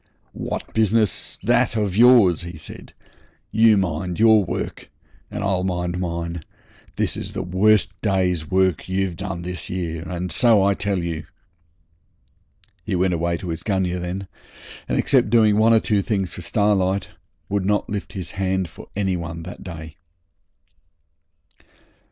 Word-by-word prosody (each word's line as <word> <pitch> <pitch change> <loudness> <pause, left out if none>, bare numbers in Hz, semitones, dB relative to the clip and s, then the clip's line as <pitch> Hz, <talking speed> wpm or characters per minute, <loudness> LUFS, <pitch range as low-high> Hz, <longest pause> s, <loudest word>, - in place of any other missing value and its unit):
'What - - -5
business 110 -1 +1
that - - +2
of 105 -4 0
yours?' 115 -7 +6
he 85 -1 -7
said. 80 - -10 0.6
'You 110 -1 +5
mind 90 -1 -2
your 110 -2 +6
work - - -5 0.4
and 105 0 -4
I'll 95 -2 +1
mind 90 -1 -2
mine. 85 -1 -3 0.5
This - - -1
is - - -5
the - - -3
worst 100 +4 +3
day's 90 -6 0
work 95 -2 +1
you've 95 -1 -1
done 95 -1 -5
this 90 0 -6
year, 85 -3 -3
and 90 0 -4
so 115 -5 +4
I 100 0 +3
tell 100 0 -1
you.' 85 -3 -4 1.6
He - - -2
went 90 0 +2
away 85 0 0
to 90 -1 -7
his 80 0 -4
gunyah 95 -3 -1
then, 90 +2 -4 0.6
and - - +1
except - - +3
doing 110 -2 +4
one 110 +1 +5
or 115 - +6
two 105 -2 +1
things 95 -3 -2
for - - -7
Starlight 100 0 +1 0.4
would 100 -1 -1
not 105 +2 +1
lift 105 -1 -5
his 95 -3 -5
hand 95 -2 -1
for - - -13
any 95 -2 0
one 85 -1 -5
that 90 - -9
day. 80 -4 -9
95 Hz, 150 wpm, -22 LUFS, 85-105 Hz, 1.6 s, yours